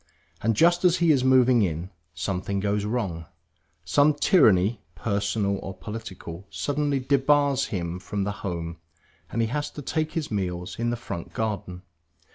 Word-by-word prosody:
And 115 Hz, 0 st, +1 dB
just 175 Hz, -, +4 dB
as 180 Hz, -1 st, +5 dB
he 170 Hz, -2 st, +4 dB
is 135 Hz, -4 st, +3 dB
moving 130 Hz, -2 st, +5 dB
in, 85 Hz, 0 st, -2 dB, 0.2 s
something 95 Hz, +1 st, -2 dB
goes 100 Hz, +1 st, 0 dB
wrong. 100 Hz, -8 st, -2 dB, 0.6 s
Some 145 Hz, +1 st, +4 dB
tyranny, 110 Hz, -, +4 dB
personal 100 Hz, +1 st, -1 dB
or 95 Hz, -, -7 dB
political, 100 Hz, -4 st, -8 dB
suddenly 145 Hz, +3 st, -1 dB
debars 140 Hz, +1 st, +3 dB
him 90 Hz, -4 st, -3 dB
from 100 Hz, +2 st, -3 dB
the 100 Hz, -, -1 dB
home; 85 Hz, -3 st, -4 dB, 0.5 s
and 115 Hz, -, 0 dB
he 110 Hz, -, -1 dB
has 145 Hz, +3 st, -2 dB
to 145 Hz, -, -9 dB
take 155 Hz, +3 st, -1 dB
his 160 Hz, -6 st, -3 dB
meals 90 Hz, -2 st, -3 dB
in 120 Hz, 0 st, 0 dB
the 120 Hz, -, 0 dB
front 100 Hz, -7 st, -7 dB
garden. 100 Hz, -5 st, -3 dB
105 Hz, 155 wpm, -26 LUFS, 95-135 Hz, 0.6 s, as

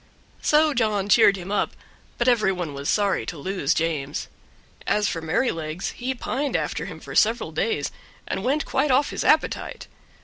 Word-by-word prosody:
So 305 Hz, 0 st, +4 dB
John 210 Hz, -5 st, 0 dB
cheered 200 Hz, -3 st, +6 dB
him 185 Hz, +1 st, -7 dB
up, 205 Hz, -, 0 dB, 0.4 s
but 240 Hz, -, 0 dB
every 225 Hz, -6 st, +4 dB
one 175 Hz, -5 st, -4 dB
was 140 Hz, +1 st, -4 dB
sorry 205 Hz, -2 st, +2 dB
to 165 Hz, -, -5 dB
lose 165 Hz, -1 st, -1 dB
James; 155 Hz, -3 st, -2 dB, 0.6 s
as 210 Hz, 0 st, +2 dB
for 165 Hz, -, -2 dB
Merrylegs, 160 Hz, -2 st, -1 dB
he 260 Hz, +2 st, -3 dB
pined 275 Hz, +3 st, -2 dB
after -, -, -1 dB
him -, -, -8 dB
for -, -, -9 dB
several 225 Hz, -6 st, +2 dB
days, 155 Hz, -2 st, -1 dB, 0.4 s
and 190 Hz, -, -3 dB
went 280 Hz, +5 st, +1 dB
quite 300 Hz, -, +1 dB
off 270 Hz, +2 st, +3 dB
his -, -, -3 dB
appetite. -, -, +1 dB
200 Hz, 170 wpm, -24 LUFS, 165-245 Hz, 0.6 s, cheered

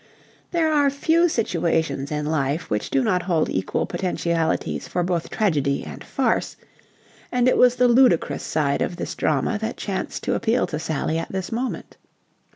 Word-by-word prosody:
There 320 Hz, -3 st, +1 dB
are 290 Hz, -2 st, +4 dB
few 325 Hz, +5 st, +2 dB
situations 160 Hz, -, -1 dB
in 150 Hz, 0 st, -2 dB
life 150 Hz, +1 st, -1 dB
which 105 Hz, 0 st, -1 dB
do 135 Hz, -, +2 dB
not 180 Hz, +5 st, +1 dB
hold 170 Hz, -4 st, 0 dB
equal 95 Hz, -, -1 dB
potentialities 170 Hz, -3 st, -1 dB
for 180 Hz, -, -1 dB
both 175 Hz, -2 st, -1 dB
tragedy 150 Hz, -10 st, 0 dB
and -, -, -9 dB
farce, -, -, -1 dB, 0.7 s
and 250 Hz, 0 st, +2 dB
it 255 Hz, -, +4 dB
was 250 Hz, 0 st, +5 dB
the 250 Hz, 0 st, +4 dB
ludicrous 245 Hz, -7 st, +3 dB
side 145 Hz, -3 st, 0 dB
of -, -, -1 dB
this 175 Hz, -, -4 dB
drama 155 Hz, -, 0 dB
that 220 Hz, +2 st, -4 dB
chanced 195 Hz, -2 st, -4 dB
to -, -, 0 dB
appeal 235 Hz, +2 st, +1 dB
to 155 Hz, -, -4 dB
Sally 160 Hz, 0 st, -1 dB
at -, -, -6 dB
this 190 Hz, -1 st, -4 dB
moment. 245 Hz, +3 st, -4 dB
175 Hz, 165 wpm, -23 LUFS, 155-245 Hz, 0.7 s, was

